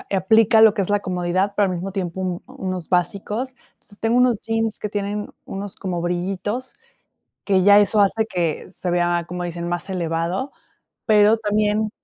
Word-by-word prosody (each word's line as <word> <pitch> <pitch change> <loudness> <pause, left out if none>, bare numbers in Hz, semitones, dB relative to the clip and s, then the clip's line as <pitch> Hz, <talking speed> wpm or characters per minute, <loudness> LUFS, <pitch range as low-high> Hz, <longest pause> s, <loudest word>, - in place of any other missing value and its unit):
aplica 220 +3 +4
lo 220 -2 +7
que 205 - -1
es 185 - -6
la 205 0 +2
comodidad, 185 +1 -1
pero, 205 - +3
al 185 - -1
mismo 190 +3 -4
tiempo, 185 -1 -3
unos 185 -3 -6
básicos. 210 +8 -1 0.2
Entonces, 205 - -17
tengo 225 +2 +1
unos 250 -4 +3
jeans, 225 -1 -1
que 210 - -4
tienen 205 0 -3 0.2
unos 195 0 -6
como 180 -3 -4
brillitos, 195 +8 -3 0.7
que 190 -2 +2
ya 205 +1 +7
eso 205 +1 +3
hace 220 +3 +2
que 175 -4 -2
se 180 - -5
vea, 175 -1 +1
como 180 0 -5
dicen, 170 0 -4
más 175 +2 -4
elevado, 175 - -2 0.6
pero 215 +1 +5
también, 210 0 0
195 Hz, 170 wpm, -21 LUFS, 180-215 Hz, 0.7 s, lo